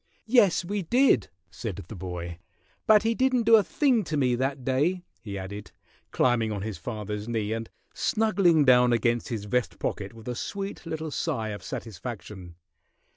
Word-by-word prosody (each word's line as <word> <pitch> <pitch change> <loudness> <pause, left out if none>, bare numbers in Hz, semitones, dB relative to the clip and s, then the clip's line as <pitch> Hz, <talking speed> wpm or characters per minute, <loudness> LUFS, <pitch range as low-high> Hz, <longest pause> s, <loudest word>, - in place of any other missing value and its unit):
"Yes, 210 -7 +4
we 205 +3 -2
did," 240 - +3 0.2
said 105 +1 -5
the 110 - -8
boy. 90 -2 -6 0.5
"But 215 -1 +6
he 225 +1 +2
didn't 255 0 +2
do 225 +1 +7
a 220 - +7
thing 250 0 +2
to 150 0 -2
me 130 -3 +2
that 130 +1 -2
day," 155 +8 +1 0.2
he 100 -2 -6
added, 100 +2 -7 0.4
climbing 115 -3 +2
on 100 -2 -3
his 110 -2 -5
father's 105 -2 -5
knee 110 -2 -1
and 115 0 -4 0.2
snuggling 195 -8 +3
down 125 -1 +6
against 115 +1 +1
his 110 -4 -4
vest 125 +3 -1
pocket 100 +2 -3
with 115 0 -13
a 125 - -2
sweet 195 +6 -5
little 160 -1 -4
sigh 130 -9 -2
of 105 -2 -6
satisfaction. 100 -4 -7
125 Hz, 170 wpm, -27 LUFS, -, 0.5 s, do